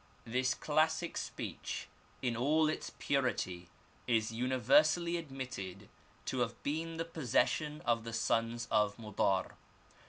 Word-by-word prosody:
This 130 +3 +1
classic 160 +3 +1
speech - - -4 0.4
in 120 -2 +1
all 150 +6 +3
its 155 - -3
purity 90 -10 0 0.4
is 115 -2 +2
universally 130 +8 +3
admitted 125 - -6 0.4
to 130 - -1
have 120 -1 -2
been 160 +3 -2
the 165 - -1
possession 150 0 +1
of 115 -2 +1
the 115 - -5
sons 115 +1 0
of 105 -2 +3
Modar. 100 -4 0
125 Hz, 120 wpm, -34 LUFS, 115-155 Hz, 0.4 s, all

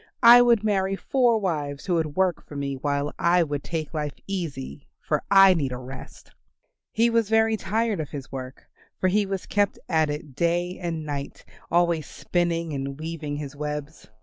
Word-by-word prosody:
I 240 +1 +10
would 235 -3 +4
marry 195 -2 +1
four 240 +2 +2
wives 150 -8 -3
who 185 - 0
would 160 -3 -1
work 185 -2 +1
for 145 - -12
me 140 -1 -2
while 145 +2 -2
I 175 0 +4
would 145 -3 -4
take 160 -2 -4
life 150 -2 -3
easy, 155 -7 -5
for 150 -2 -1
I 195 -1 +8
need 145 -7 -1
a 125 - -4
rest." 130 +1 -11 0.6
He 235 +1 +2
was 230 -2 +2
very 225 0 +3
tired 215 0 -1
of 155 - -4
his 140 -2 -8
work 130 -1 -7 0.4
for 185 - +2
he 205 +1 +2
was 195 -1 -3
kept 205 -1 +1
at 160 -2 +2
it 150 -1 -5
day 175 +3 0
and 165 -3 -3
night 140 -2 -6 0.2
always 170 -2 +2
spinning 170 -2 -1
and 135 0 -4
weaving 155 -2 -4
his 145 -1 -6
webs. 150 0 -5
165 Hz, 180 wpm, -25 LUFS, 145-195 Hz, 0.6 s, I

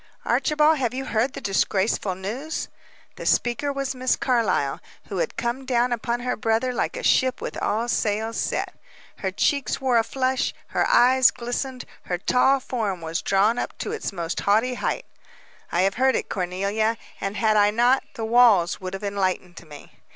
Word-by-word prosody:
"Archibald, 305 0 +3
have 250 -2 -1
you 265 +1 -3
heard 235 +3 0
the - - -6
disgraceful 195 0 0
news?" 240 - -4 0.5
The - - -7
speaker 245 +4 +1
was 275 -1 -3
Miss 255 0 +1
Carlyle, 220 - 0 0.3
who 195 - -3
had - - -2
come 240 +3 -2
down 245 -1 +1
upon 240 +1 -2
her 250 0 -1
brother 225 +3 0
like 245 - -2
a - - -6
ship 260 -1 +3
with - - -5
all 225 +3 0
sails 220 0 -1
set. - - -2 0.4
Her 190 - -2
cheeks 280 +8 0
wore 255 -3 +3
a - - +2
flush; 260 +2 -1
her - - +1
eyes 255 +1 +6
glistened; 245 +2 -4 0.2
her 180 - -2
tall 260 +8 +3
form 215 -8 -3
was 165 +1 -3
drawn 205 +5 +2
up - - -4
to - - -4
its 440 - -3
most 170 -3 -3
haughty 220 +5 +2
height. - - -2 0.7
"I 175 - +2
have 195 +1 +2
heard 265 0 +4
it, - - -2
Cornelia, 200 +5 -1 0.2
and, 195 +1 -3
had 220 -1 +2
I 205 -1 +5
not, 240 +5 +3
the 225 - -3
walls 220 -8 +4
would 185 0 -5
have 195 - -8
enlightened 185 -3 -2
me." 145 -1 -12
230 Hz, 180 wpm, -24 LUFS, 195-255 Hz, 0.7 s, eyes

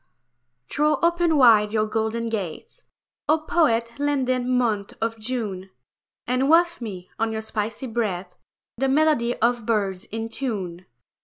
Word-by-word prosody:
Throw 300 +1 +1
open 340 -2 +3
wide 220 -5 +6
your 215 -1 +1
golden 220 +1 -2
gates, 215 - -5 0.5
O 310 - +5
poet 235 -7 +1
landed 260 -4 0
month 235 -6 0
of 225 0 -2
June, 215 -5 -4 0.6
And 255 +3 +1
waft 340 -1 +4
me, 190 -6 -7
on 225 0 0
your 220 0 -3
spicy 220 +2 -4
breath, 200 -7 -3 0.4
The 270 +2 +1
melody 275 -4 +2
of 235 -1 +1
birds 200 -3 0
in 225 +1 -5
tune. 190 -9 -4
230 Hz, 135 wpm, -24 LUFS, 215-265 Hz, 0.6 s, wide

